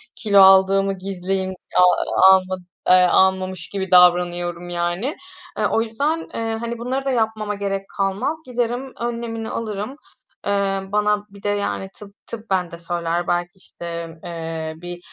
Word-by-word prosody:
kilo 200 Hz, -3 st, +4 dB
aldığımı 195 Hz, +1 st, +6 dB
gizleyeyim, 190 Hz, 0 st, -3 dB, 0.2 s
a -, -, +7 dB, 0.5 s
alma 190 Hz, 0 st, +4 dB, 0.3 s
eee, -, -, +8 dB
almamış 185 Hz, 0 st, +2 dB
gibi 190 Hz, -2 st, -4 dB
davranıyorum, 175 Hz, -1 st, +3 dB
yani. 175 Hz, -, -2 dB, 0.4 s
E, 215 Hz, -, +1 dB
o 225 Hz, -, +2 dB
yüzden, 285 Hz, +9 st, -2 dB
eee, 225 Hz, 0 st, -2 dB
hani, 235 Hz, +1 st, -4 dB
bunları 260 Hz, +3 st, -2 dB
da 270 Hz, -, +1 dB
yapmama 220 Hz, -3 st, -1 dB
gerek 195 Hz, -1 st, -3 dB
kalmaz, 195 Hz, +11 st, 0 dB
giderim 245 Hz, +1 st, -2 dB
önlemini 230 Hz, -1 st, -4 dB
alırım, 215 Hz, +3 st, -4 dB, 0.5 s
eee, 200 Hz, -1 st, +1 dB
bana 210 Hz, 0 st, +1 dB
bir 200 Hz, 0 st, -16 dB
de, 205 Hz, -, 0 dB
yani, 200 Hz, -1 st, -2 dB
tıp, 200 Hz, -1 st, -13 dB
tıbben 230 Hz, -1 st, -8 dB, 0.2 s
bende 170 Hz, -1 st, -10 dB
söyler, 170 Hz, 0 st, -2 dB
belki, 175 Hz, +1 st, -1 dB
işte, 170 Hz, -2 st, -8 dB
eee, 165 Hz, -1 st, -5 dB
bir, 175 Hz, +1 st, -8 dB
195 Hz, 145 wpm, -21 LUFS, 175-220 Hz, 0.5 s, eee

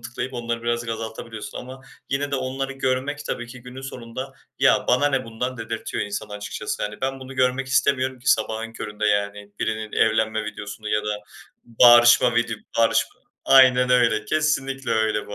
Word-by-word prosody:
tıklayıp 120 Hz, +2 st, -6 dB
onları 115 Hz, -1 st, -3 dB
birazcık 120 Hz, 0 st, -1 dB
azaltabiliyorsun 110 Hz, 0 st, -6 dB
ama 130 Hz, +1 st, -9 dB, 0.3 s
yine 140 Hz, +1 st, -1 dB
de 140 Hz, -, 0 dB
onları 135 Hz, +1 st, -3 dB
görmek 135 Hz, +2 st, -2 dB
tabii 120 Hz, -, -4 dB
ki 120 Hz, 0 st, -12 dB
günün 125 Hz, +2 st, -10 dB
sonunda, 130 Hz, 0 st, -7 dB, 0.3 s
"Ya, -, -, +4 dB
bana 125 Hz, +4 st, +4 dB
ne 135 Hz, -2 st, 0 dB
bundan!" 125 Hz, +3 st, -4 dB
dedirtiyor 115 Hz, 0 st, -4 dB
insana 105 Hz, +1 st, -5 dB
açıkçası. 105 Hz, +1 st, -5 dB
Hani, 105 Hz, 0 st, -5 dB
ben 135 Hz, 0 st, -2 dB
bunu 130 Hz, 0 st, -9 dB
görmek 130 Hz, +1 st, +1 dB
istemiyorum 130 Hz, -1 st, +1 dB
ki 125 Hz, -, +1 dB
sabahın 110 Hz, +1 st, 0 dB
köründe, 105 Hz, -1 st, -4 dB
yani, 100 Hz, 0 st, -1 dB
birinin 110 Hz, -1 st, -3 dB
evlenme 110 Hz, 0 st, +1 dB
videosunu 105 Hz, +1 st, -7 dB
ya 105 Hz, 0 st, 0 dB
da 105 Hz, 0 st, -1 dB, 0.5 s
bağırışma 120 Hz, +1 st, +6 dB
vidi 115 Hz, -2 st, -1 dB
bağırışma 115 Hz, 0 st, +2 dB, 0.2 s
Aynen 125 Hz, -1 st, +6 dB
öyle. 120 Hz, -4 st, +3 dB
Kesinlikle 135 Hz, -1 st, -1 dB
öyle 110 Hz, -1 st, +1 dB
bu 105 Hz, -, -7 dB
120 Hz, 165 wpm, -23 LUFS, 110-130 Hz, 0.5 s, bağırışma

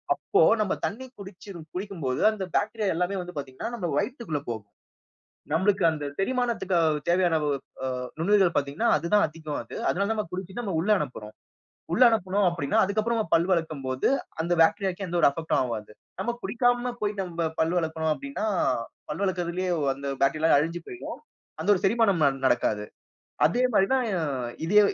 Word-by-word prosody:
அப்போ, -, -, +1 dB, 0.2 s
நம்ம 205 Hz, -, +1 dB
தண்ணீ 260 Hz, +5 st, -4 dB
குடிச்சு 200 Hz, 0 st, -11 dB, 0.3 s
குடிக்கும் 190 Hz, -3 st, -5 dB
போது, 130 Hz, 0 st, -1 dB
அந்த 205 Hz, -3 st, -4 dB
பாக்டீரியா 215 Hz, -1 st, -1 dB
எல்லாமே 180 Hz, +3 st, -1 dB
வந்து 180 Hz, -3 st, -9 dB
பாத்தீங்கன்னா, 135 Hz, -, -5 dB
நம்ப 190 Hz, -7 st, -3 dB
வயித்துக்குள்ள 235 Hz, -, -2 dB
போகும். 100 Hz, -3 st, -7 dB, 0.8 s
நம்மளுக்கு 190 Hz, +3 st, +2 dB
அந்த 150 Hz, -2 st, -5 dB
செரிமானத்திற்கு 235 Hz, -4 st, 0 dB, 0.3 s
தேவையான 175 Hz, -1 st, +3 dB, 0.5 s
அ -, -, 0 dB, 0.3 s
நுண்ணுயிர்கள் 190 Hz, +1 st, +3 dB
பாத்தீங்கன்னா, 145 Hz, +10 st, 0 dB
அது 155 Hz, -, -3 dB
தான் 205 Hz, -, +5 dB
அதிகம் 155 Hz, -1 st, -5 dB
அது. 115 Hz, -, -10 dB
அதனால, 200 Hz, +2 st, +1 dB
நாம 215 Hz, -1 st, -2 dB
குடிச்சு 185 Hz, +3 st, -6 dB
நாம 200 Hz, -7 st, -3 dB
உள்ள 195 Hz, +6 st, -1 dB
அனுப்புறோம். 105 Hz, -8 st, -6 dB, 0.6 s
உள்ள 245 Hz, -, +5 dB
அனுப்புனோம் 200 Hz, -3 st, +1 dB
அப்படின்னா, 145 Hz, -5 st, -1 dB
அதற்கு 200 Hz, +3 st, +1 dB
அப்புறம் 225 Hz, -4 st, -1 dB
பல் 170 Hz, +2 st, +4 dB
விளக்கும் 160 Hz, -5 st, -1 dB
போது, 130 Hz, 0 st, 0 dB, 0.3 s
அந்த 170 Hz, +2 st, 0 dB
பாக்டீரியாவுக்கு 190 Hz, +3 st, +2 dB
எந்த 175 Hz, 0 st, -2 dB
ஒரு -, -, +7 dB
அஃபெக்ட் 160 Hz, +3 st, -4 dB
உம் -, -, +3 dB
ஆகாது. 110 Hz, -4 st, -5 dB, 0.3 s
நாம் 240 Hz, -, 0 dB
குடிக்காம 245 Hz, 0 st, +1 dB
போய் 210 Hz, 0 st, 0 dB
நாம 170 Hz, -3 st, -2 dB
பல் 160 Hz, +2 st, +2 dB
விளக்குறோம் 160 Hz, -1 st, 0 dB
அப்படின்னா, 280 Hz, -5 st, -4 dB, 0.7 s
பல் 150 Hz, -, -4 dB
விளக்குறதிலேயே 180 Hz, -1 st, -1 dB, 0.2 s
அந்த 140 Hz, +1 st, -7 dB, 0.2 s
பாக்டீரியா 155 Hz, +2 st, +4 dB
அழிஞ்சு 165 Hz, +3 st, -2 dB
போயிடும். 360 Hz, -, -7 dB, 0.4 s
அந்த -, -, -2 dB
ஒரு 185 Hz, -, -3 dB
செரிமானம் 200 Hz, -4 st, +3 dB
ந -, -, +6 dB, 0.2 s
நடக்காது. 105 Hz, -4 st, +1 dB, 0.6 s
அதே 245 Hz, +2 st, 0 dB
மாரி 195 Hz, -2 st, +4 dB
தான், 260 Hz, -2 st, +2 dB, 0.2 s
அ -, -, 0 dB, 0.4 s
இதே 205 Hz, +5 st, +5 dB
180 Hz, 165 wpm, -26 LUFS, 160-210 Hz, 0.8 s, ஒரு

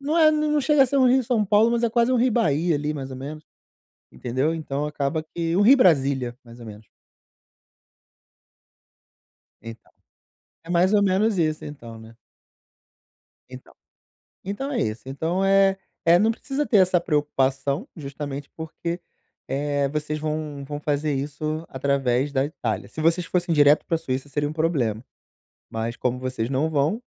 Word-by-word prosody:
não 295 Hz, +4 st, -1 dB
é, 315 Hz, -2 st, +7 dB
n 305 Hz, 0 st, 0 dB
não 300 Hz, -1 st, +2 dB
chega 275 Hz, +1 st, +4 dB
a -, -, +3 dB
ser 280 Hz, +3 st, -1 dB
um 260 Hz, -2 st, +5 dB
Rio-São 245 Hz, -3 st, +2 dB
Paulo, 210 Hz, +3 st, +4 dB
mas 235 Hz, 0 st, 0 dB
é 235 Hz, -, +2 dB
quase 235 Hz, +2 st, +2 dB
um -, -, +3 dB
Rio-Bahia, 180 Hz, -, +2 dB
ali, 150 Hz, +1 st, -2 dB
mais 135 Hz, -2 st, -6 dB
ou 130 Hz, -, -7 dB
menos, 150 Hz, +4 st, -8 dB, 0.7 s
entendeu. 130 Hz, -, -1 dB
Então 150 Hz, -2 st, -3 dB
acaba 150 Hz, +1 st, -2 dB
que 165 Hz, +1 st, -3 dB
um 195 Hz, -, +3 dB
Rio-Brasília, 140 Hz, -, +4 dB
mais 120 Hz, 0 st, -14 dB
ou 115 Hz, -, -10 dB
menos. 105 Hz, 0 st, -11 dB, 2.7 s
Então, 115 Hz, 0 st, -11 dB, 0.7 s
é 165 Hz, -, -15 dB
mais 180 Hz, +3 st, +3 dB
ou 205 Hz, -, +4 dB
menos 200 Hz, +2 st, +2 dB
isso, 155 Hz, -2 st, 0 dB
então, 115 Hz, -6 st, -10 dB
né. 110 Hz, +1 st, -14 dB, 1.3 s
Então 130 Hz, 0 st, -12 dB, 0.7 s
então 270 Hz, +9 st, -4 dB
é 235 Hz, -, 0 dB
isso, 110 Hz, +2 st, -3 dB
então, 160 Hz, +8 st, -2 dB
eh 195 Hz, 0 st, +4 dB, 0.3 s
eh, 170 Hz, +1 st, +6 dB
não 215 Hz, +3 st, +3 dB
precisa 275 Hz, +5 st, -3 dB
ter 215 Hz, -, +3 dB
essa 185 Hz, -1 st, +4 dB
preocupação, 145 Hz, -, -1 dB
justamente 145 Hz, -1 st, -7 dB
porque, 170 Hz, +2 st, -5 dB, 0.5 s
eh, 140 Hz, +1 st, -1 dB
vocês 150 Hz, +1 st, -3 dB
vão 150 Hz, -2 st, -4 dB
vão 145 Hz, +1 st, -6 dB
fazer 150 Hz, 0 st, -1 dB
isso 155 Hz, +3 st, -3 dB
através 135 Hz, 0 st, 0 dB
da 135 Hz, -1 st, +2 dB
Itália. 145 Hz, +3 st, -4 dB
Se -, -, -9 dB
vocês 165 Hz, +2 st, +2 dB
fossem 175 Hz, -2 st, 0 dB
direto 145 Hz, 0 st, +5 dB
pra 165 Hz, -, 0 dB
Suíça 135 Hz, -3 st, -4 dB
seria 145 Hz, +1 st, -2 dB
um -, -, -6 dB
problema, 140 Hz, -10 st, 0 dB, 0.7 s
mas 115 Hz, +1 st, -4 dB
como 125 Hz, 0 st, -2 dB
vocês 130 Hz, -3 st, -3 dB
não 140 Hz, +4 st, 0 dB
vão, 155 Hz, -, 0 dB
155 Hz, 160 wpm, -24 LUFS, 135-190 Hz, 2.7 s, é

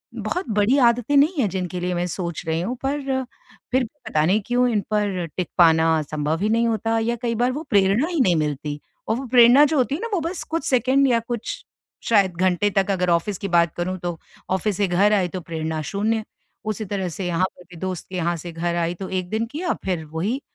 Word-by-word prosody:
बहुत 235 Hz, -, -3 dB
बड़ी 240 Hz, +7 st, +3 dB
आदतें 245 Hz, +4 st, 0 dB
नहीं 300 Hz, +6 st, +5 dB
हैं, 210 Hz, -, +1 dB
जिनके 180 Hz, -1 st, -3 dB
लिए 180 Hz, 0 st, -2 dB
मैं 175 Hz, +1 st, -1 dB
सोच 170 Hz, -1 st, -4 dB
रही 160 Hz, +1 st, 0 dB
हूँ, 240 Hz, +8 st, -2 dB
पर 285 Hz, +2 st, -1 dB, 0.7 s
फिर 260 Hz, 0 st, +3 dB
भी 225 Hz, -, -6 dB, 0.2 s
पता 155 Hz, 0 st, +2 dB
नहीं 200 Hz, +5 st, +2 dB
क्यों, 245 Hz, +1 st, +2 dB
इन 210 Hz, -3 st, +1 dB
पर 200 Hz, -4 st, 0 dB
टिक 180 Hz, -, -2 dB
पाना 160 Hz, -2 st, +5 dB
संभव 155 Hz, +2 st, -1 dB
ही 210 Hz, -, +1 dB
नहीं 230 Hz, +1 st, +2 dB
होता 225 Hz, 0 st, 0 dB
या 235 Hz, +2 st, 0 dB
कई 230 Hz, -1 st, -1 dB
बार 245 Hz, +3 st, +1 dB
वो 300 Hz, +5 st, -4 dB
प्रेरणा 200 Hz, -, +3 dB
ही 340 Hz, -4 st, -2 dB
नहीं 180 Hz, -7 st, +3 dB
मिलती 150 Hz, -1 st, -2 dB, 0.3 s
और 220 Hz, -, +1 dB
वो 270 Hz, -, -5 dB
प्रेरणा 245 Hz, +3 st, +7 dB
जो 300 Hz, 0 st, 0 dB
होती 270 Hz, +2 st, +1 dB
है 345 Hz, -, -6 dB
ना, 465 Hz, -, -2 dB
वो 370 Hz, -, +2 dB
बस 335 Hz, +3 st, -4 dB
कुछ 325 Hz, -3 st, -3 dB
सेकंड 260 Hz, +2 st, +3 dB
या 235 Hz, -2 st, +3 dB
कुछ 230 Hz, -1 st, -5 dB, 0.5 s
शायद 195 Hz, -5 st, +3 dB
घंटे 185 Hz, +3 st, +2 dB
तक, 195 Hz, 0 st, +1 dB
अगर 180 Hz, -2 st, 0 dB
ऑफ़िस 175 Hz, +3 st, +1 dB
की 200 Hz, -, -4 dB
बात 170 Hz, -2 st, +3 dB
करूँ, 185 Hz, +2 st, -2 dB
तो 175 Hz, -2 st, -4 dB, 0.3 s
ऑफ़िस 190 Hz, +1 st, 0 dB
से 200 Hz, -2 st, +2 dB
घर 200 Hz, +4 st, +3 dB
आई, 190 Hz, -3 st, +2 dB
तो 180 Hz, +1 st, -6 dB
प्रेरणा 160 Hz, -1 st, -3 dB
शून्य। 215 Hz, +2 st, 0 dB, 0.5 s
उसी 215 Hz, 0 st, -3 dB
तरह 190 Hz, -2 st, -2 dB
से 180 Hz, +3 st, -5 dB
यहाँ 175 Hz, +2 st, +1 dB
पर 180 Hz, -, -15 dB
भी 175 Hz, -, -12 dB
दोस्त 185 Hz, -3 st, -4 dB
के 185 Hz, -, -7 dB
यहाँ 175 Hz, 0 st, 0 dB
से 170 Hz, +2 st, -7 dB
घर 170 Hz, +1 st, -2 dB
आई, 170 Hz, 0 st, 0 dB
तो 190 Hz, +2 st, -7 dB
1 185 Hz, -1 st, -3 dB
दिन 220 Hz, +1 st, -1 dB
किया, 335 Hz, +4 st, -1 dB
फिर 180 Hz, -4 st, -2 dB
वही 210 Hz, +12 st, -2 dB
195 Hz, 235 wpm, -22 LUFS, 175-235 Hz, 0.7 s, प्रेरणा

